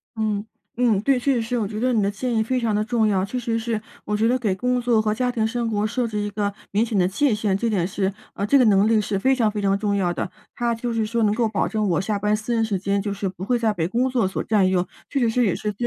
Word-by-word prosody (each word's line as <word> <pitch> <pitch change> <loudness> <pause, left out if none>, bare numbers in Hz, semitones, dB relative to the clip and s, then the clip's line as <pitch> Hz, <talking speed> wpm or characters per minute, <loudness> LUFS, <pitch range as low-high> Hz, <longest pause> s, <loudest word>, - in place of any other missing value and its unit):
嗯 215 -1 -1 0.3
嗯， 230 -5 +3
对。 265 +2 +2
确 270 +1 +1
实 235 - +1
是 240 +2 -2
我 210 - -1
觉 210 +1 -6
得 255 +2 +1
你 220 - +2
的 200 - +1
建 240 +4 -3
议 220 - +3
非 255 +3 0
常 225 -3 0
地 210 - +1
重 235 -2 +1
要， 190 -2 +1
确 235 +6 -4
实 230 -1 -1
是 225 -1 -2 0.2
我 210 - -1
觉 220 +2 +2
得， 255 - +3
给 210 -6 0
工 250 +5 0
作 235 -2 +3
和 215 -1 0
家 250 +3 0
庭 225 -2 0
生 235 0 -2
活 210 -1 0
设 235 +2 -1
置 215 - -4
一 205 0 -2
个 205 -1 -2 0.2
明 215 +3 +2
显 220 -3 -2
的 180 - +4
界 250 +6 +1
限， 205 -3 0
这 230 +2 -1
点 190 -6 +1
是， 195 0 -1 0.2
呃 200 - -2
这 280 +6 +4
个 255 - +5
能 205 -1 +4
力 225 -1 +4
是 200 -1 -2
非 265 +6 +3
常 225 -4 +2
非 210 -1 -3
常 195 0 +2
重 205 0 0
要 180 -3 +1
的。 180 - -3 0.3
它 235 -1 0
就 235 +1 -3
是 225 -1 0
说， 230 +2 -1
能 210 0 +3
够 230 -2 +2
保 205 - 0
证 215 -1 -1
我 170 - +2
下 205 +2 -1
班 210 +1 +1
私 215 +3 -3
人 225 - +2
时 205 -4 -1
间， 200 +1 0
就 200 0 -3
是 200 0 -3
不 185 0 -9
会 245 +1 +1
再 220 -2 +1
被 165 -3 -1
工 245 +6 0
作 245 -5 +1
所 190 - -3
占 205 -4 +3
用， 185 -1 +1 0.2
确 280 - -1
实 240 -3 +2
是 240 +1 +2
也 190 - +2
是 210 -1 -3
215 Hz, 335 characters per minute, -23 LUFS, 200-235 Hz, 0.3 s, 个